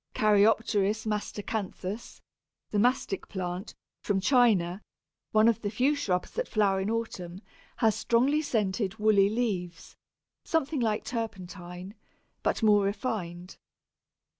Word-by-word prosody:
Caryopteris 215 0 +3
Mastacanthus, 210 -1 -4 0.5
the 210 - +1
Mastic 245 -3 +1
plant, 185 +1 -5 0.3
from 200 -2 0
China, 205 -6 +3 0.5
one 215 +1 +5
of 230 -1 +2
the 205 - -2
few 250 +7 +2
shrubs 190 -12 -1
that - - -3
flower 200 -3 +2
in 190 +2 -1
autumn, 190 -6 -4 0.4
has 225 -3 +3
strongly 245 +7 +2
scented 205 -7 -1
woolly 210 -2 +4
leaves, 200 -7 -3 0.5
something 320 -4 0
like 220 -3 0
turpentine, 185 -5 -6 0.5
but - - -1
more 205 -2 +5
refined. 195 -4 -4
210 Hz, 115 wpm, -28 LUFS, 190-230 Hz, 0.5 s, one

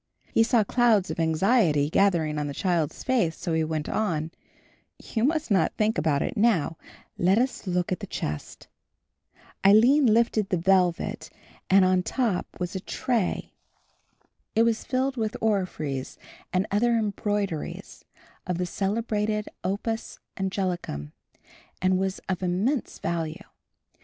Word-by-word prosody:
He - - +4
saw 225 -1 +4
clouds 220 -3 +2
of - - -5
anxiety 160 - +3
gathering 160 -4 +2
on 145 - -2
the 140 - -5
child's 170 -5 -1
face, 230 -11 +1
so 170 - -3
he 160 0 +2
went 155 -1 -2
on, 165 -7 -1 0.7
"You 220 - -3
must 310 -1 0
not 185 -5 +2
think 215 -2 +1
about 150 -2 +1
it - - -3
now; 205 -8 +2 0.4
let 185 +4 +4
us 250 -3 -1
look 180 0 0
at 185 - -1
the 200 - -7
chest." 75 - -5 1.0
Aline 240 +8 +6
lifted 220 -2 +2
the 180 - +1
velvet 180 0 +1 0.4
and 190 0 +6
on 185 0 +3
the - - +2
top 220 -1 -1
was 180 +1 -3
a - - -1
tray. 230 +1 -2 1.0
It 225 - +5
was 230 -1 +1
filled 260 +1 -1
with 220 -2 -2
orphreys 180 -11 -2 0.3
and 185 +2 +1
other 235 +4 +2
embroideries 205 -5 -3 0.4
of 180 -2 -1
the 180 - -1
celebrated 210 +2 -1
opus 210 +4 -3 0.2
anglicum 180 - -3 0.7
and 185 0 +2
was 190 0 -1
of 190 -1 -2
immense 195 +10 -1
value. 165 -2 -3
190 Hz, 140 wpm, -26 LUFS, 170-220 Hz, 1.0 s, Aline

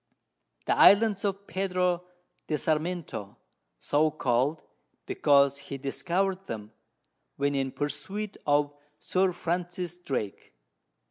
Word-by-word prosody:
The - - +2
Islands 205 -1 +6
of 200 0 -2
Pedro 180 -2 0 0.4
de 155 - 0
Sarmiento, 155 - -2 0.4
so 155 +2 +2
call'd, 140 +1 0 0.4
because 140 -1 +3
he 140 0 -7
discover'd 185 +8 -1
them, 105 -1 -6 0.6
when 140 +1 0
in 135 -1 -1
Pursuit 150 +10 -4
of 145 0 +3 0.2
Sir 185 0 +1
Francis 175 0 -3
Drake. 120 - -4
155 Hz, 105 wpm, -28 LUFS, 140-185 Hz, 0.6 s, Islands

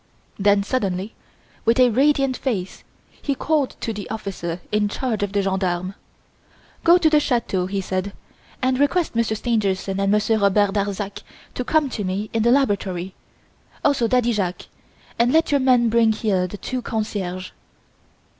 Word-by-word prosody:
Then 200 0 +3
suddenly, 200 -3 -2 0.5
with 230 +2 +2
a 250 -1 +6
radiant 275 +1 +2
face, 200 -10 -3 0.4
he 280 - -1
called 300 -1 0
to 225 - -2
the 205 -1 -7
officer 185 -5 -4
in 210 -1 +1
charge 225 -1 -2
of 205 -1 -1
the 200 0 0
gendarmes. 190 -1 -1 0.9
"Go 340 +1 +7
to 340 - +3
the 305 -1 +5
chateau," 230 -9 0
he 195 +1 -2
said, 185 +1 -3 0.5
"and 255 0 +1
request 305 +4 +1
Monsieur 230 -1 +1
Stangerson 200 -4 -1
and 195 0 +1
Monsieur 215 +1 +2
Robert 200 0 +3
Darzac 200 0 -3 0.3
to 250 - -3
come 310 +3 +2
to 210 - -3
me 195 +3 -3
in 225 - +1
the 235 - +3
laboratory, 200 -8 +1 0.7
also 275 -5 +3
Daddy 245 0 +2
Jacques; 180 -4 -2 0.5
and 240 +1 +4
let 320 +1 +3
your 285 - +3
men 250 -3 +4
bring 225 -1 +3
here 195 -4 0
the 205 - -8
two 255 +4 -4
concierges." 200 -5 -4
215 Hz, 160 wpm, -22 LUFS, 195-250 Hz, 0.9 s, Go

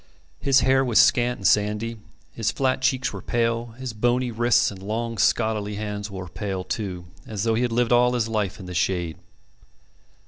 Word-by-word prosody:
His 135 -2 +4
hair 135 0 +3
was 120 -4 +3
scant 120 0 +4
and 95 - 0
sandy, 105 +4 +1 0.3
his 115 -2 -1
flat 130 -1 0
cheeks 130 0 +1
were - - -6
pale, 115 0 0
his 130 -3 -5
bony 120 +3 +1
wrists 120 0 +2
and 95 -2 -10
long 115 +2 -3
scholarly 105 0 +1
hands 105 0 -4
were 95 -2 -7
pale, 95 +1 -4
too, 90 -2 -4 0.2
as 105 -2 -4
though 115 -1 +2
he 115 - +1
had 125 -1 0
lived 120 +1 +1
all 125 0 +4
his 120 -3 0
life 105 -4 -2
in 95 - -9
the 90 - -7
shade. 85 -3 -1
110 Hz, 185 wpm, -24 LUFS, 100-120 Hz, 0.3 s, His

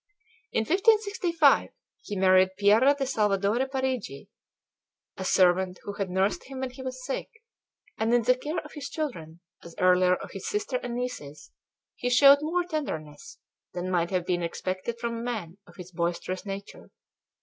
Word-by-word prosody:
In - - +1
1565 375 - +3 0.3
he 205 - -6
married 185 0 +4
Piera 220 +8 +5
de 275 - -1
Salvadore 210 0 +1
Parigi, 260 - -3 0.9
a 190 - -6
servant 185 0 +3
who 205 - -5
had 200 -2 -3
nursed 190 +3 0
him 265 -1 -8
when 260 -1 -3
he 260 +1 -11
was 255 -1 -6
sick; 270 - -4 0.7
and 220 +1 +1
in 240 -1 +3
the 250 +3 +5
care 295 +6 -5
of 300 - -13
his 285 -2 -6
children, 170 - -5 0.2
as 170 - -12
earlier 180 0 +4
of - - -9
his 195 - -7
sister 210 +5 -1
and 240 -1 -5
nieces, 240 - -6 0.5
he 245 - -2
showed 275 +3 +7
more 340 +4 0
tenderness 310 - -5 0.4
than 180 +1 -3
might 175 -1 +1
have 180 -2 -1
been 175 -1 0
expected 185 +6 -4
from 230 -1 -3
a - - -5
man 210 -7 -5
of - - -17
his 180 -1 -10
boisterous 175 +3 -3
nature. 195 0 -8
215 Hz, 165 wpm, -27 LUFS, 185-265 Hz, 0.9 s, showed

